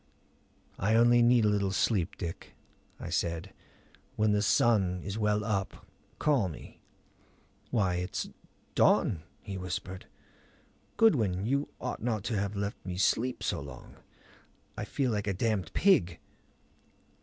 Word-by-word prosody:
"I 110 Hz, +4 st, +2 dB
only 120 Hz, +1 st, +5 dB
need 120 Hz, -1 st, +5 dB
a -, -, +4 dB
little 100 Hz, -1 st, +1 dB
sleep, 95 Hz, -2 st, 0 dB
Dick," 85 Hz, -2 st, -7 dB, 0.4 s
I -, -, -6 dB
said. 85 Hz, +3 st, -2 dB, 0.6 s
"When 110 Hz, 0 st, +2 dB
the 105 Hz, 0 st, +2 dB
sun 95 Hz, -5 st, +2 dB
is 100 Hz, 0 st, -4 dB
well 105 Hz, -1 st, +1 dB
up, 100 Hz, -3 st, -3 dB, 0.3 s
call 135 Hz, -11 st, +2 dB
me." 80 Hz, -, -11 dB, 0.9 s
"Why, 95 Hz, -6 st, +1 dB
it's 90 Hz, +3 st, -3 dB, 0.5 s
dawn," 85 Hz, -6 st, +3 dB, 0.2 s
he 95 Hz, -3 st, -6 dB
whispered. 90 Hz, +1 st, -5 dB, 0.9 s
"Goodwin, 110 Hz, -, +3 dB
you 140 Hz, +4 st, 0 dB
ought 125 Hz, -, -4 dB
not 110 Hz, -4 st, -1 dB
to 115 Hz, -, -2 dB
have 100 Hz, +1 st, -2 dB
let 100 Hz, +1 st, -4 dB
me 90 Hz, -2 st, -5 dB
sleep 120 Hz, +6 st, +1 dB
so -, -, -1 dB
long. 70 Hz, -3 st, -11 dB, 0.8 s
I -, -, -4 dB
feel 130 Hz, -3 st, -1 dB
like 105 Hz, -1 st, -2 dB
a 100 Hz, -, 0 dB
damned 100 Hz, -4 st, -1 dB
pig." 90 Hz, -, +3 dB
100 Hz, 135 wpm, -30 LUFS, 90-115 Hz, 0.9 s, only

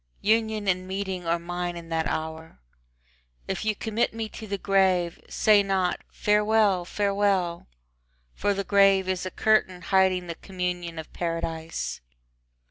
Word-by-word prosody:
Union 220 Hz, -1 st, +1 dB
and 185 Hz, 0 st, 0 dB
meeting 190 Hz, -2 st, -4 dB
are 170 Hz, +1 st, +2 dB
mine 175 Hz, +1 st, -4 dB
in 165 Hz, -1 st, -10 dB
that 160 Hz, -1 st, 0 dB
hour. 160 Hz, -, -5 dB, 0.9 s
If -, -, -3 dB
you 215 Hz, -1 st, 0 dB
commit 220 Hz, +2 st, -1 dB
me 225 Hz, -1 st, -3 dB
to 220 Hz, -, -9 dB
the 200 Hz, 0 st, -2 dB
grave, 190 Hz, -3 st, +2 dB
say 210 Hz, -2 st, +4 dB
not 190 Hz, -2 st, 0 dB
"Farewell, 210 Hz, -3 st, +2 dB
farewell!" 195 Hz, -3 st, 0 dB, 0.7 s
For 205 Hz, -, 0 dB
the 200 Hz, -, -2 dB
grave 195 Hz, -1 st, +4 dB
is 185 Hz, 0 st, -1 dB
a -, -, -3 dB
curtain 200 Hz, -3 st, +2 dB
hiding 190 Hz, -2 st, +2 dB
the 170 Hz, -, -4 dB
communion 180 Hz, -2 st, -4 dB
of 160 Hz, -, -8 dB
Paradise. 165 Hz, -1 st, -3 dB
190 Hz, 140 wpm, -26 LUFS, 175-205 Hz, 0.9 s, say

